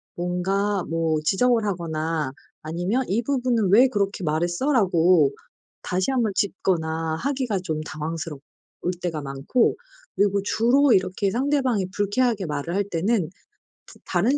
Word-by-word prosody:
뭔가 190 Hz, +3 st, -1 dB
뭐 165 Hz, -1 st, 0 dB
지적을 230 Hz, +4 st, +2 dB
하거나 160 Hz, -5 st, -2 dB, 0.3 s
아니면 175 Hz, +11 st, -1 dB
"이 220 Hz, +5 st, +1 dB
부분은 245 Hz, -6 st, +1 dB
왜 245 Hz, +6 st, +7 dB
그렇게 200 Hz, -4 st, -1 dB
말했어?"라고 175 Hz, -, +2 dB, 0.5 s
다시 185 Hz, +7 st, -1 dB
1 260 Hz, -2 st, +1 dB
번 215 Hz, -3 st, +1 dB
짚거나 165 Hz, -5 st, -1 dB
하기가 255 Hz, -4 st, -1 dB
좀 155 Hz, -3 st, -2 dB
당황스러울 155 Hz, 0 st, -5 dB, 0.6 s
때가 165 Hz, -4 st, -2 dB
많고 140 Hz, -, 0 dB, 0.4 s
그리고 200 Hz, 0 st, +2 dB
주로 245 Hz, +6 st, +3 dB
이렇게 190 Hz, +1 st, +1 dB
상대방이 255 Hz, -6 st, +1 dB
불쾌하게 205 Hz, 0 st, +1 dB
말을 150 Hz, +3 st, -3 dB
할 200 Hz, -, +2 dB
때는 185 Hz, +1 st, 0 dB, 0.6 s
다 -, -, -15 dB
다른 225 Hz, +11 st, +1 dB
190 Hz, 285 characters per minute, -24 LUFS, 165-230 Hz, 0.6 s, 왜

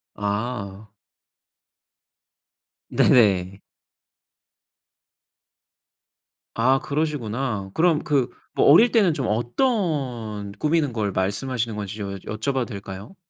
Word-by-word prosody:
아. 105 Hz, -1 st, -4 dB, 2.0 s
네네. 95 Hz, -4 st, +3 dB, 2.9 s
아 130 Hz, +4 st, +3 dB
그러시구나. 130 Hz, -8 st, -2 dB
그럼 165 Hz, -2 st, +2 dB
그 135 Hz, -4 st, +1 dB, 0.3 s
뭐 -, -, +3 dB
어릴 225 Hz, +11 st, +7 dB
때는 195 Hz, -9 st, +3 dB
좀 135 Hz, -, -2 dB
어떤 120 Hz, -, -1 dB
꾸미는 150 Hz, +2 st, 0 dB
걸 105 Hz, -3 st, -1 dB
말씀하시는 110 Hz, +5 st, -2 dB
건지 105 Hz, -1 st, -5 dB
좀 100 Hz, -2 st, -5 dB
여쭤 110 Hz, +8 st, -3 dB
봐도 130 Hz, -2 st, 0 dB
될까요? 100 Hz, -, -9 dB
115 Hz, 175 characters per minute, -23 LUFS, 100-140 Hz, 2.9 s, 어릴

